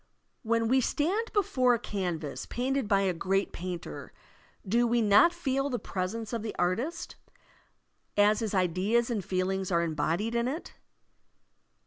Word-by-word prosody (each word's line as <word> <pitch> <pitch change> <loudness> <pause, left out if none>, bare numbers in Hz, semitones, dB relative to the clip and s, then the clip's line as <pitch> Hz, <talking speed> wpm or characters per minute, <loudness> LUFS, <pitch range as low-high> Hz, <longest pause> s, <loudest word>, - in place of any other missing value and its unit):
When 230 0 +1
we 260 +3 +3
stand 375 - 0
before 275 - +3
a - - -4
canvas 175 -9 -4
painted 260 0 -1
by 200 -2 +3
a 190 -2 +1
great 195 +3 0
painter, 180 -1 -6 0.5
do 235 +5 +3
we 240 +1 +2
not 210 +9 +6
feel 275 -5 -1
the 250 - -1
presence 205 +3 -4
of 230 - -1
the 215 0 -5
artist, 240 - -2 1.0
as 210 +1 +4
his 215 -3 -2
ideas 190 +7 +1
and 210 -5 -1
feelings 190 +1 -1
are 170 -1 +2
embodied 165 +7 -1
in 235 0 +1
it? 305 +7 -5
220 Hz, 145 wpm, -29 LUFS, 185-250 Hz, 1.0 s, not